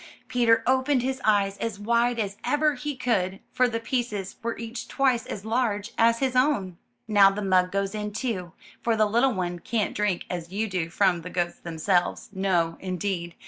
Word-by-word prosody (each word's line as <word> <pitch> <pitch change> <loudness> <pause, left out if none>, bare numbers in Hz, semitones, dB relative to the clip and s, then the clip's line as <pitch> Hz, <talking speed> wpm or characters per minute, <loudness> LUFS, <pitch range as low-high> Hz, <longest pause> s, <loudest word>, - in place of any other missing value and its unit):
Peter 235 -2 +3
opened 260 0 +2
his 260 0 -2
eyes 200 -2 +2
as 225 -3 -3
wide 235 +3 +2
as 205 -3 -2
ever 300 +1 +2
he 285 +2 -4
could, 195 -7 0
for 255 - +3
the 230 -1 -2
pieces 230 -5 -3
were 230 0 -3
each 230 +1 -6
twice 255 -4 +1
as 200 0 -6
large 220 -2 0
as 230 0 +4
his 260 0 -1
own. 220 - +1 0.3
*'Now 200 -2 +6
the 200 +1 -4
mug 185 -1 +3
goes 200 0 -1
in, 210 -1 -3
too, 205 -6 -3 0.3
for 230 -1 +1
the 215 0 +3
little 235 +4 +2
one 175 -1 -2
can't 220 +3 -1
drink 205 -4 -1
as 175 -1 -5
you 215 +3 -1
do 180 -5 -2
from 180 -1 +2
the 180 - -7
goats 175 -1 -2
themselves; 175 +2 0
no, 180 -4 +1
indeed. 180 -2 -3
210 Hz, 185 wpm, -26 LUFS, 185-240 Hz, 0.3 s, Now